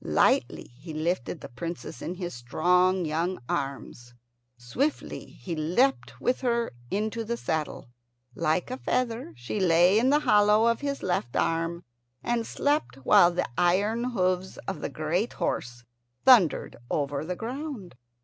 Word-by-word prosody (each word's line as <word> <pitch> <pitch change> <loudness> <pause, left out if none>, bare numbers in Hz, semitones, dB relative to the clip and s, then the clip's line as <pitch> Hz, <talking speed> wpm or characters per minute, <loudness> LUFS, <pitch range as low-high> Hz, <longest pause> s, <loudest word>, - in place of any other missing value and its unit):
Lightly - - +1
he 160 +1 -8
lifted 160 -3 -2
the - - -7
Princess 165 0 -7
in 175 - -4
his 175 -1 -5
strong 180 +9 +2
young 165 +4 -1
arms. 120 -3 -4 0.4
Swiftly 240 - -2
he 175 -3 -7
leapt 180 - +1
with 250 - 0
her 235 -2 0 0.2
into 215 +3 -2
the 235 +2 -3
saddle. 155 - -3 0.5
Like 170 - 0
a 255 - -3
feather 250 -1 -1
she 120 - -4
lay 180 +2 +5
in 250 +3 +3
the 295 +2 +4
hollow 210 -1 +4
of 235 0 +2
his 280 -1 -3
left 120 -10 -1
arm, 165 +1 0 0.4
and 235 -1 -1
slept 290 +2 0
while 175 - +7
the 175 - -1
iron 205 +7 +2
hoofs 185 -6 -1
of 190 -6 -4
the - - -3
great 155 - -1
horse 120 -1 -3 0.4
thundered 230 - +5
over 140 -1 -1
the 180 +3 -3
ground. 245 - -6
180 Hz, 145 wpm, -27 LUFS, 160-230 Hz, 0.5 s, while